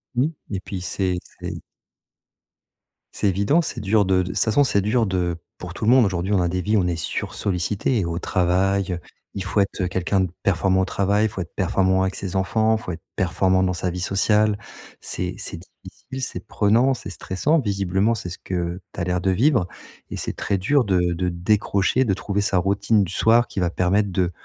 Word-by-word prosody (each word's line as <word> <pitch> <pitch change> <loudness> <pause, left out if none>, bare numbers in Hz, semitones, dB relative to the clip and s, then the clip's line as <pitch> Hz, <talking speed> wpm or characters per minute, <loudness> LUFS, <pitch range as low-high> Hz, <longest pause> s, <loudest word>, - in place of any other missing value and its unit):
Mmh 130 +5 +2 0.2
et 100 - -2
puis, 95 -1 -6
c'est 90 0 -1 0.2
c'est - - -5 1.5
c'est - - 0
évident, 100 - +3
c'est 160 - -5
dur 105 +1 +3
de 95 0 +2
de - - +4
de - - -6
toute 90 - -4
façon, 110 +6 +3
c'est 100 -7 +2
dur 115 +3 +2
de 90 -3 -1 0.2
pour 90 0 -8
tout 100 - -7
le 115 - +5
monde, 130 -2 +6
aujourd'hui, 95 0 -1
on 95 - +3
a 90 - +1
des 90 +1 -1
vies. 105 +4 +1
On 90 -3 +2
est 85 - 0
sursollicités 100 - -1
et 95 - 0
au 85 0 -3
travail, 95 +2 +1
heu, 85 - -4 0.4
il 100 - -3
faut 95 +2 -1
être, 100 0 0
heu, 90 - +1
quelqu'un 95 +2 0
de 95 - 0
performant 95 0 +2
au - - +1
travail, 100 +3 +1
il - - +1
faut 95 - -5
être 85 - -8
performant 95 0 +2
avec 95 0 -1
ses 95 -2 -5
enfants, 110 +4 +2
il 110 - -9
faut - - -5
être - - -10
performant 95 +1 +2
dans 90 -1 +1
sa 90 +1 -2
vie 90 - -5
sociale. 105 +3 +2 0.4
C'est - - -3
c'est - - -6 0.3
difficile, 135 0 -9
c'est - - -5
prenant, 115 +6 +3
c'est 120 - -7
stressant, 140 - 0
visiblement, 100 -1 +1
c'est 95 -4 -6
ce 90 - -7
que 90 -1 -3
tu - - -7
as - - +1
l'air 90 +1 0
de 95 - +1
vivre 120 - +3 0.4
et - - -5
c'est - - -3
très 100 - -1
dur 125 +9 +2
de 90 -3 +2
de 90 +1 -1
décrocher, 100 +6 +1
de 100 - +2
trouver 100 +1 -2
sa 100 -2 +1
routine 100 +3 +2
du 90 - -4
soir 115 +4 +4
qui - - -5
va 90 - +1
permettre 95 +4 +1
de 90 -1 0
95 Hz, 220 wpm, -23 LUFS, 90-105 Hz, 1.5 s, monde